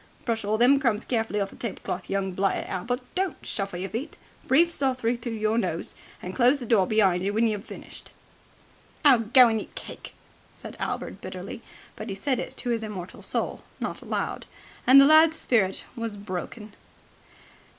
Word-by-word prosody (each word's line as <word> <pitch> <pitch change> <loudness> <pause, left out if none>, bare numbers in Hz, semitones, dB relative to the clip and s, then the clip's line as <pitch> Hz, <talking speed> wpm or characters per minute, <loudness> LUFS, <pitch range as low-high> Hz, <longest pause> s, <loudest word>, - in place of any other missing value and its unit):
Brush 225 -2 -1
all 210 +2 0
them 255 +4 +5
crumbs 235 -6 0
carefully 225 -3 -1
off 195 -1 -2
the - - -13
tablecloth, 195 -4 -5
young 195 -1 -1
blighted 190 +1 0
Albert 245 +8 -3
don't 375 -1 -1
shuffle 195 -3 -3
your 185 +1 -4
feet 235 +8 -5 0.3
breathe 335 +6 +5
softly 255 -6 0
through 235 0 -5
your 220 +1 +1
nose - - -2 0.3
and - - -5
close 255 +3 +4
the 245 - -5
door 215 -5 +3
be'ind 195 -5 +3
you 200 - 0
when 220 +3 +2
you've 210 -2 -2
finished!" - - -11 0.9
"Oh, 265 -5 +7
go 240 +3 +6
and 225 -2 0
eat - - -12
cake!" - - -9 0.4
said - - -10
Albert - - -4
bitterly. - - -7 0.3
But 215 +1 -7
he 195 - -3
said 255 +5 -1
it - - -6
to 245 - -1
his 230 -1 0
immortal 200 -5 -7
soul, - - -2 0.2
not - - -4
aloud. - - -3 0.4
The 260 - +7
lad's 315 +2 +6
spirit 195 -10 +1
was 230 -3 -4
broken. 205 +2 -6
225 Hz, 175 wpm, -26 LUFS, 200-250 Hz, 0.9 s, Oh